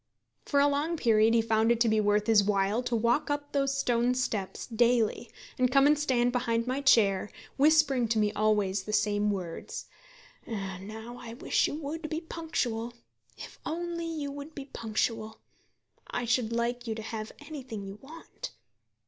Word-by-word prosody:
For 280 - +2
a 285 - +5
long 295 +4 0
period 225 -3 +4
he 225 - +4
found 225 0 +2
it 235 - +2
to 235 - +5
be 220 -1 +3
worth 205 0 +2
his 215 -2 +5
while 200 +2 +1
to 245 -1 -1
walk 235 +7 +1
up 290 0 -2
those 275 -1 0
stone 245 -1 +2
steps 220 -6 -2
daily, 235 0 +1 0.3
and 250 0 +4
come 275 +1 +5
and 295 +1 +6
stand 255 -5 +1
behind 230 -2 0
my 260 +2 -1
chair, 205 -7 +4 0.3
whispering 285 -4 +4
to 225 0 0
me 210 -1 +2
always 210 -2 +1
the 210 +2 -6
same 210 -1 +2
words: 180 -5 -4 0.6
"Now 215 +3 -6
I 230 -1 -8
wish - - +1
you - - -4
would 310 +1 -5
be 315 - -2
punctual. 245 -9 -3 0.4
If - - -10
you - - -3
only 335 -3 -3
would 285 +2 -8
be 275 - -6
punctual, 220 -2 -2 0.7
I 245 - -2
should 235 -1 +1
like 240 +1 -1
you 220 - -2
to 220 - -6
have 220 -1 -5
anything 260 -9 -7
you 195 +1 -9
want." 330 - -9
235 Hz, 175 wpm, -29 LUFS, 215-280 Hz, 0.7 s, and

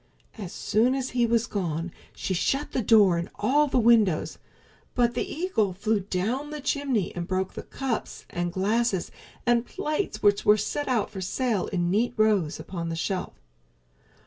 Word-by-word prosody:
As 195 -6 -7
soon 235 +5 +1
as 265 -1 -3
he 240 -1 +2
was 230 0 +2
gone 175 -6 -3 0.2
she 190 - -3
shut 275 +11 0
the 255 - 0
door 205 -6 +5
and 170 - -4
all 285 +8 +2
the 265 - 0
windows, 225 -8 +3 0.6
but 240 -1 +3
the 245 - -3
eagle 250 - 0
flew 210 +3 0
down 210 +9 -2
the 300 0 -5
chimney 275 -8 -1
and 170 -1 -4
broke 190 0 -1
the - - -6
cups 265 -4 -4
and 175 0 -2
glasses 200 +1 0 0.3
and 240 -1 +3
plates 310 +4 -3
which 205 -1 +4
were 210 +1 +6
set 290 +7 -2
out 240 -6 0
for 195 -3 -6
sale 215 +1 -1
in 175 -2 -1
neat 235 +5 +1
rows 210 -8 +2
upon 170 -3 -5
the 165 - -3
shelf. 185 +3 -3
215 Hz, 170 wpm, -26 LUFS, 185-250 Hz, 0.6 s, were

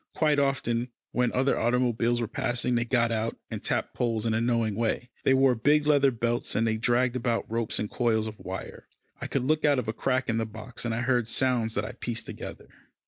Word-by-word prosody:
Quite 150 -2 +3
often, 125 -4 0 0.2
when 125 -1 +1
other 130 +2 +1
automobiles 120 0 +1
were 115 - -1
passing, 120 +3 -1
they 120 -1 +1
got 115 -1 +2
out, 115 0 -1
and - - -5
tapped - - -1
poles 115 -2 -1
in 115 - +1
a 110 - +1
knowing 115 -2 +1
way. 115 +3 -1
They 135 - +4
wore 135 -1 +5
big 145 +6 +3
leather 145 -2 +5
belts, 120 -1 -1
and 115 - +2
they 110 -1 +1
dragged 120 +2 +1
about 120 -2 0
ropes 115 0 -1
and 105 - -1
coils 110 -1 +1
of 110 -1 -7
wire. - - -7 0.3
I - - -3
could 135 - -1
look 155 +3 +1
out 145 -2 +4
of 125 - -2
a 110 - -1
crack 130 +3 0
in 115 0 0
the 115 - 0
box, 110 +3 -7
and 115 -1 -1
I 115 - -1
heard 125 -2 +1
sounds 120 -3 0
that 100 - 0
I - - -5
pieced 120 -1 -4
together. - - -8
120 Hz, 225 wpm, -27 LUFS, 115-130 Hz, 0.3 s, wore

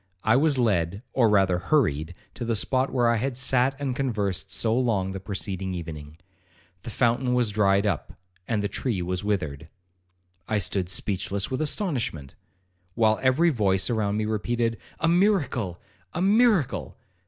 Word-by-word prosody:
I 110 - +4
was 145 +1 +3
led, 100 -4 0
or 120 -4 +4
rather 95 -4 +3
hurried 90 - 0 0.2
to 125 - -6
the 115 -1 0
spot 130 +5 0
where 125 -2 +2
I 115 0 +3
had 125 +2 -2
sat 130 +1 +2
and 135 -3 -2
conversed 100 -8 -2
so 110 +3 +1
long 110 -7 0
the 95 - -5
preceding 95 -1 -3
evening. 80 -3 -8 0.6
The - - -7
fountain 125 +2 +1
was 120 -4 +2
dried 100 -1 +2
up, 95 -7 -2 0.3
and 105 -3 0
the - - +1
tree 100 -1 -2
was 90 +2 -3
withered. 80 -8 -2 0.8
I 110 - 0
stood 95 -2 -2
speechless 100 +2 -2
with 130 - -1
astonishment, 135 - -2 0.6
while 110 -2 +3
every 135 +7 +3
voice 100 -4 +1
around 105 -2 0
me 110 - 0
repeated, 115 +2 -1 0.2
'A 165 - +3
miracle! 160 - +1 0.4
a 170 - -1
miracle! 210 - +2
110 Hz, 155 wpm, -25 LUFS, 95-130 Hz, 0.8 s, I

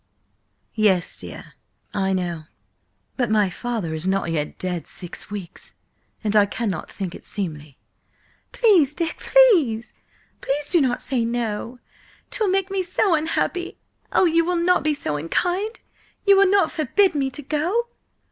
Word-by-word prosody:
"Yes, 200 -6 +1
dear, - - -10 0.4
I 195 -2 0
know. 175 -4 -2 0.7
But 245 -4 0
my 210 -3 +2
father 220 -6 -3
is 160 +3 -4
not 190 -3 0
yet 150 -2 -2
dead 180 -2 -4
six 175 -2 -7
weeks, 195 -4 -9 0.5
and 215 -1 0
I 205 -1 +6
cannot 200 -5 -3
think 190 -4 -5
it - - -11
seemly–" 150 -8 -6 0.7
"Please, 360 - +4
Dick, 335 -2 -2
please! 330 - +4 0.5
Please 290 +1 -1
do 345 -3 +4
not 250 -2 0
say 255 -3 0
no! 235 0 -3 0.5
'Twill 450 -5 0
make 385 0 0
me 390 -1 0
so 370 +1 +1
unhappy! 330 +3 -1 0.3
Oh, - - +4
you 335 0 +3
will 355 +2 0
not 350 +1 +3
be 305 -1 +1
so 150 - -2
unkind? 360 - -1 0.4
You 400 -1 +7
will 390 -1 +5
not 390 -4 +3
forbid 360 +6 +2
me 275 -3 0
to 290 +3 -9
go?" 350 - -1
255 Hz, 150 wpm, -23 LUFS, -, 0.7 s, You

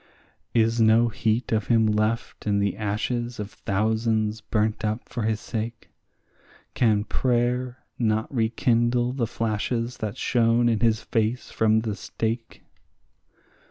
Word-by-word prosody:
Is 115 0 +3
no 115 +2 +5
heat 110 +2 -1
of 110 -2 0
him 115 -2 +4
left 110 +1 -1
in 100 -1 +2
the 100 -2 0
ashes 120 +3 -2
of 105 0 -5
thousands 110 +1 0
burnt 110 0 -1
up 110 +2 -2
for 120 - -4
his 110 0 0
sake? 115 +1 -5 0.8
Can 110 -4 +2
prayer 125 +2 0 0.2
not 110 +1 0
rekindle 120 +1 +1
the 125 -4 -1
flashes 115 +2 -2
that 110 0 -4
shone 120 -1 +2
in 115 -2 +2
his 115 -1 +2
face 115 +2 -1
from 110 0 +3
the 110 -2 -3
stake? 115 +2 -4
115 Hz, 130 wpm, -25 LUFS, 110-120 Hz, 0.8 s, no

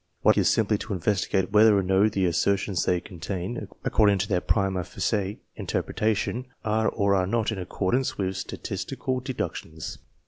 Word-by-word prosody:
What - - +7
I - - 0
undertake - - +5
is - - +3
simply 105 -1 +2
to 110 - -4
investigate 95 +1 0
whether 105 0 +6
or 100 - +2
no 95 +3 +3
the 100 -2 0
assertions 95 +1 +1
they 90 - +2
contain, 95 +4 -5 0.2
according 105 -2 +4
to 100 +2 -1
their 90 -3 +1
primd 95 -3 +1
facie 100 -1 -2
interpretation, 110 +3 -1 0.2
are 110 0 +2
or 100 -2 +1
are 95 -2 +2
not 110 +2 0
in 105 - -4
accordance 95 +7 -1
with 95 -1 -1
statistical 130 +6 -3
deductions. 120 - -5
100 Hz, 170 wpm, -26 LUFS, 95-110 Hz, 0.2 s, What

